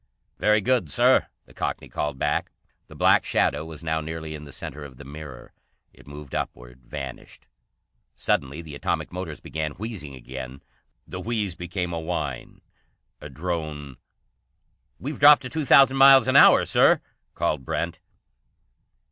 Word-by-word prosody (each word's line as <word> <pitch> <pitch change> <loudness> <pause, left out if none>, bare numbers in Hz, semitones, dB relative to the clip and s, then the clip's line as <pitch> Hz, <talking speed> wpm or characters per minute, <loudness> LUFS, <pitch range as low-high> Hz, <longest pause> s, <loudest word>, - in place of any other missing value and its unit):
"Very 105 0 +3
good, 120 -7 +1
Sir," - - +3 0.2
the - - -19
Cockney - - -4
called 75 -2 -3
back. - - -1 0.4
The - - -14
black - - +4
shadow 75 +2 0
was 80 -1 -10
now 80 0 -1
nearly 80 0 -6
in 75 -1 -8
the 70 - -12
centre 75 +3 -7
of 65 -3 -11
the 70 - -11
mirror. 75 -2 -10 0.4
It - - -19
moved 70 -1 -10
upward, - - -5
vanished. 65 0 -9 0.7
Suddenly 70 +4 -1
the 80 -2 -10
atomic 85 +1 -3
motors 90 -4 -6
began 80 -1 -4
wheezing 95 - -7
again. 65 +1 -9 0.4
The - - -7
wheeze 110 -5 -2
became 90 0 -4
a 85 - -2
whine, 80 -6 -5 0.6
a 75 - -8
drone. 75 -3 -5 1.0
"We've 145 +3 -6
dropped 145 -1 +8
to 130 - -6
two 160 0 -3
thousand 135 0 +6
miles 135 -1 +8
an 130 - +1
hour, - - +7
Sir," - - +4 0.4
called 75 -4 -1
Brent. - - -3
80 Hz, 150 wpm, -24 LUFS, 70-95 Hz, 1.0 s, dropped